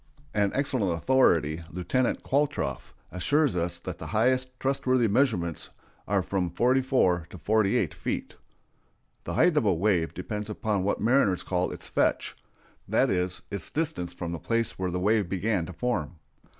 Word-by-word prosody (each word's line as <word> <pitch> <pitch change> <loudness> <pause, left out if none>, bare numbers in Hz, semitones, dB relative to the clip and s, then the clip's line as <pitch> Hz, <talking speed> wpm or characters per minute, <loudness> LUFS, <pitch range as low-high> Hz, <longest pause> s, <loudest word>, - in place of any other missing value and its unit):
An 100 -2 +2
excellent 130 -8 0
authority, 85 - +3
Lieutenant 90 +9 -1
Qualtrough, 145 +2 -1 0.2
assures 145 - +1
us 85 0 -1
that 85 - -7
the - - -6
highest 130 +3 +1
trustworthy 130 -3 +1
measurements 100 - 0 0.4
are 100 -2 +1
from 90 -1 -1
forty 125 +9 +2
four 90 -11 +2
to - - -10
forty 105 +4 +2
eight - - 0
feet. - - -4 0.9
The - - -3
height 175 -4 +4
of 130 - +3
a 100 - +4
wave 90 -2 +1
depends 105 +4 -5
upon 105 -1 -1
what 100 - 0
mariners 110 -5 +3
call 90 -1 0
its - - -7
"fetch"—that - - -1
is, 90 0 -1
its 100 - -2
distance 120 - -1
from 90 -1 -5
the 85 - -4
place 115 +4 -1
where 95 -1 -1
the 90 +1 -2
waves 105 +1 +2
began 95 -2 0
to 90 - -8
form. 90 -4 -2
100 Hz, 160 wpm, -27 LUFS, 90-125 Hz, 0.9 s, height